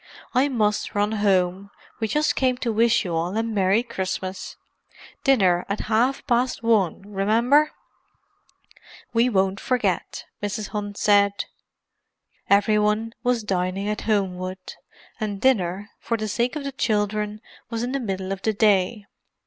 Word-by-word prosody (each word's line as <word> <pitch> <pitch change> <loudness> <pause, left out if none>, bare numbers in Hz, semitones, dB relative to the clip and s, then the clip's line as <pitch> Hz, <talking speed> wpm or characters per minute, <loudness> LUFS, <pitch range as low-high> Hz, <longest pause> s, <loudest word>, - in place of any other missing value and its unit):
I 265 +3 +3
must 210 -6 0
run 205 +1 +1
home; 195 -2 +1 0.3
we 220 - 0
just 300 +8 +1
came 255 -2 +1
to 235 -3 -2
wish 230 0 +3
you 175 - -3
all 170 +5 -1
a 225 - +1
merry 210 -1 +2
Christmas. 190 -4 -4 0.7
Dinner 190 - +3
at 200 - -1
half 235 +5 +1
past 245 0 0
one, 210 -6 +2
remember!" 230 +9 +2 1.4
"We 235 +2 +3
won't 195 -2 +1
forget," 210 -9 -1 0.2
Mrs. 205 0 -3
Hunt 205 -1 -5
said. 200 -1 +3 1.0
Every 205 +1 +4
one 210 +2 0
was 245 -2 +1
dining 190 0 -1
at 210 0 -2
Homewood, 185 -2 -2 0.5
and 205 -3 -3
dinner, 205 -5 +1
for 230 - -2
the 215 0 -3
sake 235 +6 -1
of 300 - -4
the 275 - -3
children, 210 -4 -1 0.3
was 230 0 -3
in 245 - -2
the 275 - -1
middle 190 -5 -3
of 195 0 -4
the 220 - 0
day. 205 0 +2
210 Hz, 145 wpm, -24 LUFS, 195-235 Hz, 1.4 s, Every